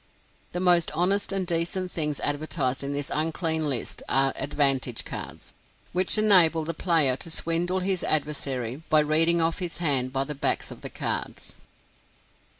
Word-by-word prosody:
The 180 - -4
most 175 -2 +3
honest 195 +5 +1
and 195 -1 -2
decent 175 +2 -2
things 150 -3 -2
advertised 145 -3 -1
in 140 - -4
this 145 +1 -4
unclean 160 0 -1
list 130 -4 -3
are 135 +1 +3
"advantage 135 -3 +1
cards" - - -8 0.4
which 185 +4 0
enable 175 -7 +5
the 165 - -3
player 155 -6 +2
to 165 - -4
swindle 170 +3 0
his 185 -1 -1
adversary 140 -4 -1
by 155 -1 +5
reading 165 +3 +3
off 165 +3 -1
his 175 -3 -4
hand 135 -7 +1
by 135 0 -1
the 150 - -5
backs 140 - -1
of - - -11
the - - -6
cards. - - -4
160 Hz, 155 wpm, -25 LUFS, 140-175 Hz, 0.4 s, enable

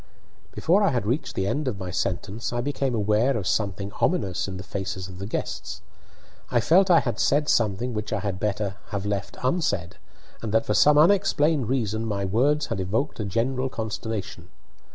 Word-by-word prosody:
Before 185 +5 +2
I 200 - +4
had 120 -5 -1
reached 125 +8 -1
the 95 - 0
end 145 +8 -1
of 115 -6 -1
my 95 -2 -5
sentence 95 +5 -2
I 120 - -2
became 135 -1 -1
aware 110 +5 +2
of 100 - -4
something 100 -1 -1
ominous 100 - +1
in 95 -1 -5
the 95 - -7
faces 95 0 -4
of 95 -1 -10
the 100 - -5
guests. - - -4 0.7
I 120 - +2
felt 185 - +4
I 170 -2 +6
had - - -3
said 145 +1 +2
something 115 +1 +1
which 105 -1 -4
I - - -1
had 100 -3 -3
better 100 -1 -2
have 100 -2 -4
left 100 -1 -3
unsaid, 100 - 0 0.4
and 110 - -4
that 110 - +3
for 105 - 0
some 150 +6 +5
unexplained 160 - +3
reason 115 -4 -1
my 100 -2 -1
words 135 +10 +2
had 115 - -3
evoked 110 +11 -1
a 110 - -2
general 130 +6 0
consternation. 110 -5 -5
110 Hz, 190 wpm, -25 LUFS, 100-135 Hz, 0.7 s, I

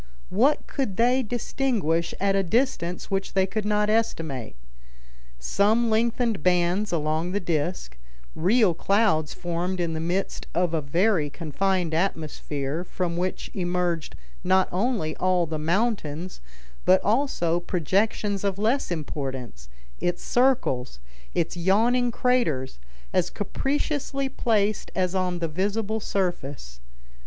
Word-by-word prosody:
What 265 +10 +3
could 240 -9 -3
they 245 +3 +4
distinguish 220 - -1
at 195 0 +2
a 195 - +3
distance 190 -4 -1
which 195 0 -1
they 190 -1 +3
could 210 +2 -3
not 210 0 +2
estimate? 165 - -1 0.8
Some 210 - +2
lengthened 230 -2 +1
bands 180 +4 +2
along 160 +2 0
the 205 - +1
disc, 165 - -2 0.4
real 200 +2 +3
clouds 195 -4 +2
formed 175 +1 -2
in 170 -2 0
the 160 - -2
midst 175 +4 -2
of 175 -1 +1
a 160 - +1
very 165 +2 +2
confined 170 +3 -1
atmosphere, 155 -3 -2
from 180 -1 -3
which 180 +2 -3
emerged 175 -3 -1 0.3
not 185 +1 +3
only 190 -5 0
all 185 -1 +2
the 155 -1 -4
mountains, 175 - -1 0.4
but 185 0 +5
also 205 - +1
projections 195 +4 0
of 195 -1 0
less 225 +7 +1
importance; 135 - -5 0.3
its 175 0 -1
circles, 240 - +1 0.4
its 165 - 0
yawning 225 +8 +3
craters, 225 - 0 0.3
as - - +2
capriciously 275 -1 -2
placed 215 -5 0
as 185 -1 +1
on 185 -2 0
the 170 -1 -1
visible 205 +6 -1
surface. 145 - -3
185 Hz, 125 wpm, -25 LUFS, 165-215 Hz, 0.8 s, but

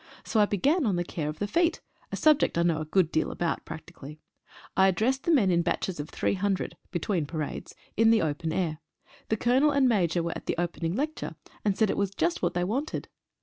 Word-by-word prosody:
So 220 - 0
I 210 - +6
began 275 - +2
on 200 - +1
the 175 - 0
care 155 -3 -4
of 155 - -6
the 205 - -1
feet, 335 +10 +1 0.3
a - - -2
subject 305 - +3
I 170 - +3
know 165 -2 +1
a - - -3
good 165 +1 +2
deal 160 - +1
about 170 -2 -2
practically. 160 -2 -10 0.6
I 190 - +5
addressed 230 +8 +1
the 340 - +3
men 220 - +4
in 170 -1 +3
batches 170 0 -2
of 145 - -5
300 195 -1 -1
(between 175 -3 -1
parades) 155 -2 -5 0.2
in 225 +1 +5
the 225 -4 +4
open 160 +1 -2
air. 160 -3 -1 0.5
The 220 - +1
Colonel 255 +7 +3
and 280 -2 +3
Major 175 -7 +2
were 170 - -2
at - - -8
the - - -1
opening 170 0 -2
lecture, 305 +5 -3 0.3
and 200 -2 +1
said 220 -3 +3
it - - -3
was 200 -1 -1
just 165 +2 0
what - - 0
they 175 - +1
wanted. 260 +11 -2
185 Hz, 220 wpm, -28 LUFS, 165-225 Hz, 0.6 s, I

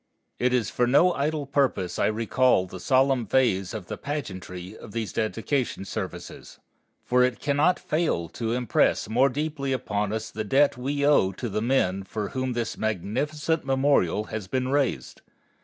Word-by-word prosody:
It 125 +1 +2
is 125 -3 +1
for 125 - +1
no 170 +8 +5
idle 150 +1 -1
purpose 135 -10 0
I - - +3
recall 115 -1 +2
the 95 0 -9
solemn 130 +2 +2
phase 100 -7 +2
of 110 -5 -6
the - - -7
pageantry 95 -9 -6
of 105 - -12
these 115 -2 -3
dedication 115 +4 -1
exercises, - - -7 0.5
for 125 0 +3
it 125 -1 +2
cannot 145 +5 +2
fail 155 - -1
to 115 +5 -3
impress 125 -4 +1
more 125 +6 +3
deeply 145 0 -3
upon 105 -5 -2
us 110 0 -4
the 110 - -4
debt 140 +7 +3
we 140 +3 -1
owe 145 -10 +4
to 120 - -5
the 105 0 -2
men 110 -6 +1
for 105 +1 -4
whom 130 -1 -2
this 115 -2 -3
magnificent 135 - -1
memorial 135 - +2
has 110 -4 -4
been 130 +2 -1
raised. 140 -2 -1
125 Hz, 165 wpm, -26 LUFS, 105-140 Hz, 0.5 s, no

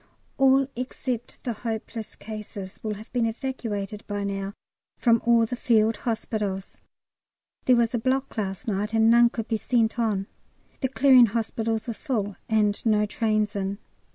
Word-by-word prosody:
All 270 0 +5
except 250 -1 -4
the 240 - -1
hopeless 225 0 -5
cases 210 -3 -8
will 215 -1 -3
have 215 +4 -12
been 240 -2 +2
evacuated 220 -4 -4
by 205 -1 -2
now 200 0 -3 0.4
from 230 -2 +3
all 235 -1 +5
the 245 - -4
Field 225 -2 +2
Hospitals. 210 -4 -3 0.9
There 255 - +6
was 235 0 +2
a 240 - +1
block 260 +3 0
last 200 +1 -3
night, 210 +1 -1
and 225 0 +5
none 235 0 +6
could 225 -1 -5
be 225 - 0
sent 230 0 +1
on. 210 -4 +1 0.5
The 260 - 0
Clearing 260 -2 +6
Hospitals 225 0 -2
were 230 - -2
full, 215 -6 -2
and 210 -2 +2
no 210 -2 +3
trains 215 0 0
in. 195 0 -2
225 Hz, 155 wpm, -26 LUFS, 210-240 Hz, 0.9 s, There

